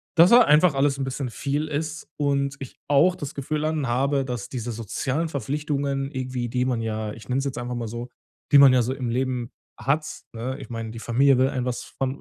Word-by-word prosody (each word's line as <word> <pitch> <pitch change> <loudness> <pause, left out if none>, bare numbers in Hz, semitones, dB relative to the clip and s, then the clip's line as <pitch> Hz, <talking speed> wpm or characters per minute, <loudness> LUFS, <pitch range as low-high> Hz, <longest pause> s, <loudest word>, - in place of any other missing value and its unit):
dass 170 +2 +7
da 240 +1 +8
einfach 155 - +5
alles 140 0 +2
'n - - 0
bisschen 130 -1 -3
viel 145 +5 -2
ist 155 +1 -4
und 140 -2 0
ich 135 - -9
auch 145 +6 +4
das 145 -5 -6
Gefühl 150 +2 -3
dann 155 -2 -1
habe, 135 +3 +1
dass 125 -5 -5
diese 120 -1 -4
sozialen 130 +8 -2
Verpflichtungen 140 0 -2
irgendwie, 130 -3 -3
die 125 +1 0
man 125 -2 0
ja, 110 -1 -3
ich 110 - -12
nenne 130 +1 0
es 135 - -2
jetzt 135 -3 -3
einfach 120 0 -4
mal 120 -1 -3
so 120 +2 -6 0.4
die 145 - +8
man 140 -1 +9
ja 125 - +4
so 125 +3 -1
im 130 -3 -4
Leben 125 -1 -1 0.3
hat, 150 +3 +1 0.3
ne? 125 +4 -4
Ich - - -10
meine, 115 -2 -5
die 115 - -8
Familie 130 +4 +3
will 130 +1 +4
einem 130 -2 -2
was 125 -1 -3
von 135 +1 -4
135 Hz, 225 wpm, -24 LUFS, 120-145 Hz, 0.4 s, man